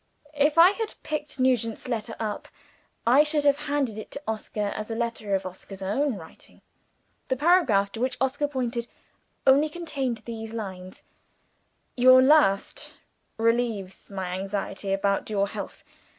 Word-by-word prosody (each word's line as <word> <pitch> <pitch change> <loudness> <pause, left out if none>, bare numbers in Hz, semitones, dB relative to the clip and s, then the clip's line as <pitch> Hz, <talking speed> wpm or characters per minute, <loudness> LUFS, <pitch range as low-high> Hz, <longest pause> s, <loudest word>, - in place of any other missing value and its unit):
If 295 +1 +2
I 345 +3 +9
had 440 +1 -4
picked 300 -2 -4
Nugent's 245 -4 +1
letter 225 -2 -3
up, 215 -2 -4 0.6
I 250 +5 +6
should 300 -1 +1
have 285 0 +5
handed 270 -7 -1
it 215 - -9
to 280 - -7
Oscar 210 -1 -3
as 215 +1 -5
a 225 - -3
letter 230 -3 -1
of 190 - -2
Oscar's 190 +1 -9
own 260 +7 0
writing. 160 -4 -14 0.6
The 260 - 0
paragraph 260 - +3
to 225 - -6
which 255 +1 -1
he 275 +3 0
pointed, 245 -4 -3 0.6
only 280 +3 +5
contained 275 -9 -4
these 225 -1 -6
lines: 185 -4 -7 0.9
"Your 255 +1 +7
last 260 -8 +3 0.4
relieves 225 -4 -1
my 190 -2 -4
anxiety 195 0 -4
about 195 +1 0
your 200 -2 +1
health. - - -7
230 Hz, 145 wpm, -26 LUFS, 200-280 Hz, 0.9 s, I